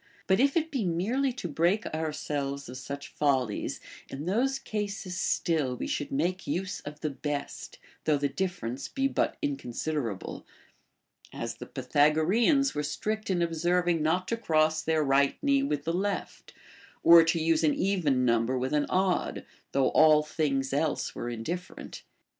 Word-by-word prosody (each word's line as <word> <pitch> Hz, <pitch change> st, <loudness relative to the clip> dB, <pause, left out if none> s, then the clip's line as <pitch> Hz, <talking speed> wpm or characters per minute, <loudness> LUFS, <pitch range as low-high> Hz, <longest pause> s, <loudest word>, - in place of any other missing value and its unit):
But 190 Hz, +2 st, +3 dB
if 275 Hz, +4 st, +3 dB
it 320 Hz, 0 st, 0 dB
be 265 Hz, -6 st, -1 dB
merely 210 Hz, +11 st, 0 dB
to 240 Hz, -8 st, -5 dB
break 170 Hz, +7 st, +1 dB
ourselves 145 Hz, -3 st, -3 dB
of 125 Hz, +1 st, -8 dB
such 140 Hz, +2 st, -7 dB
follies, 130 Hz, -7 st, 0 dB, 0.3 s
in 140 Hz, +3 st, -6 dB
those 250 Hz, +9 st, +1 dB
cases 205 Hz, -6 st, -4 dB
still 155 Hz, -7 st, 0 dB
\ve -, -, -4 dB
should 290 Hz, 0 st, -3 dB
make 185 Hz, -9 st, -1 dB
use 185 Hz, +1 st, -2 dB
of 150 Hz, +1 st, -9 dB
the 155 Hz, -, -1 dB
best, 140 Hz, +1 st, -5 dB, 0.3 s
though 155 Hz, -2 st, +3 dB
the 145 Hz, 0 st, 0 dB
difference 140 Hz, -7 st, -3 dB
be 270 Hz, 0 st, 0 dB
but -, -, -1 dB
inconsiderable; 135 Hz, -5 st, -3 dB, 0.9 s
as -, -, -5 dB
the -, -, -8 dB
Pythagoreans 190 Hz, -, +2 dB
were 150 Hz, -, -1 dB
strict 215 Hz, +9 st, -3 dB
in 175 Hz, -2 st, +1 dB
observing 170 Hz, 0 st, +1 dB
not 180 Hz, +4 st, +1 dB
to 230 Hz, -, 0 dB
cross 155 Hz, -6 st, +2 dB
their 155 Hz, -1 st, +1 dB
right 140 Hz, 0 st, +3 dB
knee 280 Hz, -1 st, +3 dB
with 150 Hz, -, -1 dB
the 165 Hz, -, -1 dB
left, 200 Hz, +3 st, -3 dB, 0.5 s
or 170 Hz, 0 st, +9 dB
to 165 Hz, +1 st, +1 dB
use 160 Hz, 0 st, +2 dB
an 150 Hz, -2 st, +3 dB
even 155 Hz, -10 st, +1 dB
number 115 Hz, +2 st, +2 dB
with 130 Hz, +2 st, -2 dB
an 150 Hz, -1 st, +1 dB
odd, 185 Hz, -1 st, 0 dB, 0.3 s
though 135 Hz, -1 st, +2 dB
all 155 Hz, -1 st, +6 dB
things 140 Hz, -3 st, -1 dB
else 150 Hz, +2 st, 0 dB
were 120 Hz, -, -4 dB
indiiferent. 165 Hz, +11 st, -6 dB
160 Hz, 160 wpm, -28 LUFS, 140-190 Hz, 0.9 s, or